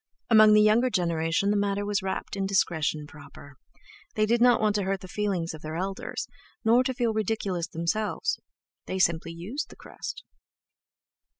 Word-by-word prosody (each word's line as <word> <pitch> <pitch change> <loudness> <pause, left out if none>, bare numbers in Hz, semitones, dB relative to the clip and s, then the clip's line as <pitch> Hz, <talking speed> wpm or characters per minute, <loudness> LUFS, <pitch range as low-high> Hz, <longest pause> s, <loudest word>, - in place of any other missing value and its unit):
Among 215 -1 +8
the 210 - +6
younger 225 +4 +4
generation 170 -1 +1
the - - +1
matter 200 0 0
was 205 0 0
wrapped 190 +1 -4
in 195 -1 -1
a - - -1
discretion 160 -6 0
proper. 145 -1 -13 0.6
They 215 - +3
did 235 +2 +1
not 245 -1 +6
want 215 -1 +2
to - - 0
hurt 195 0 -1
the 185 - -9
feelings 185 -4 -2
of 155 - -10
their 155 +1 -6
elders, 190 +3 -4 0.4
nor 235 +3 +5
to 260 - 0
feel 235 -2 0
ridiculous 205 -5 -1
themselves; 210 - -1 0.5
they 190 - -3
simply 165 -2 +1
used 190 - -5
the - - -13
crest.... - - -8
195 Hz, 175 wpm, -27 LUFS, 170-215 Hz, 0.6 s, Among